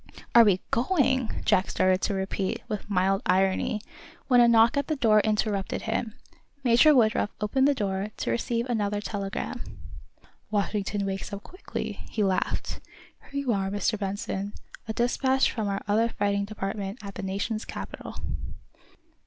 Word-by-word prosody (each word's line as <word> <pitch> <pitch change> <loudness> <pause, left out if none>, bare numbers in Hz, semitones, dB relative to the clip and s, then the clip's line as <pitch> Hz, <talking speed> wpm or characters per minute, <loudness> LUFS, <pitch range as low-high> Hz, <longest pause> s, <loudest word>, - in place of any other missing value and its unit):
"Are 235 - +9
we 195 -4 +3
going 260 -2 +2
" - - -15
Jack 185 - +3
started 185 0 +2
to 200 - 0
repeat, 190 0 -2
with 210 -2 -5
mild 195 0 +2
irony, 190 +3 +2 0.5
when 245 -2 +6
a 240 - +7
knock 230 +1 +5
at 280 -1 0
the 310 - 0
door 220 -6 +4
interrupted 210 -2 0
him. 225 0 -2 0.5
Major 255 +5 +6
Woodruff 215 -4 +3
opened 265 +6 +2
the 285 - +3
door, 195 -3 -1
to - - -1
receive 235 0 -1
another 210 -4 0
telegram. 200 -1 -4 0.9
"Washington 205 -1 -1
wakes 195 0 -4
up 200 0 -6
quickly," 370 - -6
he 215 - 0
laughed. 190 -2 -1 0.5
"Here 280 0 -3
you 255 -4 +1
are, 195 -1 -1
Mr. 205 +2 0
Benson 200 0 -3 0.3
a 220 - -2
despatch 260 +3 +2
from 220 -3 -2
our 200 0 -2
other 220 +3 +3
fighting 200 -2 0
department 200 0 -4
at 200 - -6
the - - -6
Nation's 200 +3 -2
capital." - - -7
210 Hz, 155 wpm, -27 LUFS, 195-235 Hz, 0.9 s, Are